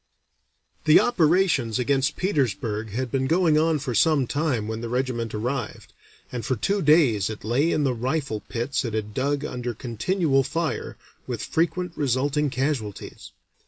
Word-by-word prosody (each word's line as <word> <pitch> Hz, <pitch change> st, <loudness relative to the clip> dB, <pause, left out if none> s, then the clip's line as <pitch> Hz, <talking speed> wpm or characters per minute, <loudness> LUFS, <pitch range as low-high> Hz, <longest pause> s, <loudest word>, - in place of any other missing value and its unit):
The 155 Hz, 0 st, +7 dB
operations 165 Hz, -, +2 dB
against 135 Hz, +4 st, +1 dB
Petersburg 115 Hz, -, -1 dB
had 120 Hz, +3 st, -3 dB
been 130 Hz, -1 st, 0 dB
going 165 Hz, -1 st, +3 dB
on 160 Hz, 0 st, +2 dB
for 135 Hz, -3 st, -4 dB
some 145 Hz, +3 st, +3 dB
time 135 Hz, -6 st, -1 dB
when 110 Hz, 0 st, -4 dB
the 120 Hz, -, -4 dB
regiment 125 Hz, -2 st, -2 dB
arrived, 125 Hz, +2 st, -4 dB, 0.4 s
and 120 Hz, -2 st, -4 dB
for 130 Hz, +4 st, 0 dB
two 200 Hz, -, 0 dB
days 140 Hz, -, +4 dB
it 110 Hz, -, -7 dB
lay 130 Hz, +10 st, +1 dB
in 150 Hz, -, +1 dB
the 135 Hz, -3 st, +1 dB
rifle 125 Hz, -1 st, -2 dB
pits 120 Hz, +4 st, -1 dB
it 115 Hz, -3 st, -3 dB
had 105 Hz, -1 st, -3 dB
dug 140 Hz, +3 st, -1 dB
under 125 Hz, -4 st, -4 dB
continual 135 Hz, -, 0 dB
fire, 160 Hz, +5 st, -3 dB, 0.3 s
with -, -, -4 dB
frequent 175 Hz, +2 st, -1 dB
resulting 145 Hz, +2 st, 0 dB
casualties. 130 Hz, -7 st, -3 dB
135 Hz, 155 wpm, -24 LUFS, 115-155 Hz, 0.4 s, The